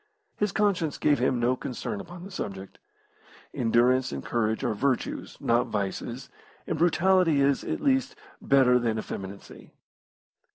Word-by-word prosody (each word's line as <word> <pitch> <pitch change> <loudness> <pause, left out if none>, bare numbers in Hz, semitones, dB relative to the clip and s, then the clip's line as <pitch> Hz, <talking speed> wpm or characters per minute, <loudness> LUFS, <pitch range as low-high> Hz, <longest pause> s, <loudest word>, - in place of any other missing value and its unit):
His 210 -1 0
conscience 195 -7 0
gave 145 -3 +2
him 125 0 +1
no 120 +2 +2
concern 140 - -5
upon 175 -1 -11
the 195 - -9
subject. 95 - -6 0.7
Endurance 125 +2 +2
and 70 -1 -6
courage 110 -2 -1
are - - 0
virtues, 130 +4 -2
not 120 +2 +1
vices, 115 +5 -4 0.4
and - - -2
brutality 175 -2 +3
is, 140 0 +2
at - - -3
least, 270 +8 +1 0.3
better 130 -2 +4
than 115 -2 -1
effeminacy. 100 -2 -8
130 Hz, 135 wpm, -27 LUFS, 115-170 Hz, 0.7 s, better